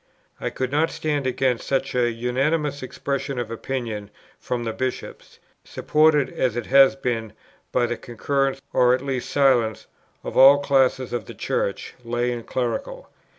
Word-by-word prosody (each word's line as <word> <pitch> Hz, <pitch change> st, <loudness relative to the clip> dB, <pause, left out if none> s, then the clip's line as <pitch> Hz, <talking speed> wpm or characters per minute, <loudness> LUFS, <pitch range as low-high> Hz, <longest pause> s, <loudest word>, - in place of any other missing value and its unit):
I -, -, -2 dB
could 130 Hz, -1 st, -3 dB
not 155 Hz, +3 st, +2 dB
stand 145 Hz, -3 st, -2 dB
against 130 Hz, -1 st, 0 dB
such 135 Hz, 0 st, -1 dB
an 120 Hz, -1 st, +2 dB
unanimous 140 Hz, +4 st, 0 dB
expression 140 Hz, +1 st, -4 dB
of 120 Hz, -2 st, -3 dB
opinion 115 Hz, -4 st, -4 dB, 0.3 s
from 120 Hz, -1 st, -3 dB
the 115 Hz, -1 st, -3 dB
Bishops, 130 Hz, +2 st, -5 dB, 0.3 s
supported, 150 Hz, -2 st, +2 dB
as 125 Hz, -4 st, -1 dB
it 120 Hz, -, -3 dB
has 135 Hz, 0 st, +6 dB
been, 115 Hz, -5 st, -3 dB, 0.4 s
by 125 Hz, -, +2 dB
the 120 Hz, 0 st, -3 dB
concurrence, 135 Hz, +3 st, -1 dB
or 125 Hz, 0 st, +4 dB
at 130 Hz, +2 st, -7 dB
least 130 Hz, -3 st, -3 dB
silence, 125 Hz, -6 st, +2 dB, 0.4 s
of -, -, -6 dB
all 135 Hz, +2 st, +8 dB
classes 130 Hz, -3 st, +1 dB
in 120 Hz, -4 st, -3 dB
the -, -, -10 dB
Church, 100 Hz, -, -2 dB
lay 120 Hz, +1 st, -1 dB
and 120 Hz, -2 st, -6 dB
clerical. 120 Hz, -3 st, -3 dB
130 Hz, 155 wpm, -23 LUFS, 120-135 Hz, 0.4 s, all